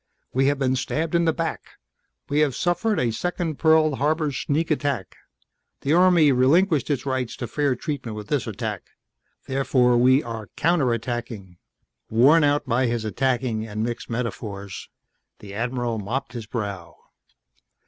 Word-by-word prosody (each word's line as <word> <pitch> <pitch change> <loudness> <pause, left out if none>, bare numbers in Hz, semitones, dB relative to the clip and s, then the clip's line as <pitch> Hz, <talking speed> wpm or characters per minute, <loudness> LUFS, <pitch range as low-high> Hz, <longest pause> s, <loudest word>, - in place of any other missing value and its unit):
We 135 +1 +2
have 145 0 +2
been 130 -1 +1
stabbed 155 +5 -2
in 170 0 +3
the 165 - +4
back 165 0 -4 0.5
we 145 +1 0
have 145 -5 +2
suffered 180 +5 0
a 120 -2 +1
second 170 +3 -3
Pearl 160 -3 +4
Harbor 155 +1 +1
sneak 150 +4 -1
attack! 140 -9 -1 0.7
The 140 - +1
Army 175 -4 +5
relinquished 150 +6 +3
its 140 -2 -1
rights 130 -3 -2
to 120 - -5
fair 140 +3 0
treatment 130 -5 -5
with 105 -1 -7
this - - -1
attack. - - -4 0.6
Therefore 130 -2 +2
we 130 +3 +5
are 110 -4 -7
counter 160 -6 +2
attacking!" 115 -6 -5 0.5
Worn 140 +9 +5
out 145 0 +2
by 125 0 +1
his 115 -2 -2
attacking 120 0 -1
and 105 0 -3
mixed 120 0 -4
metaphors, 105 -4 -5 0.5
the 100 -1 -11
Admiral 120 +1 -2
mopped 120 +4 -4
his 115 -3 -6
brow. 100 -7 -5
130 Hz, 150 wpm, -24 LUFS, 115-150 Hz, 0.7 s, Army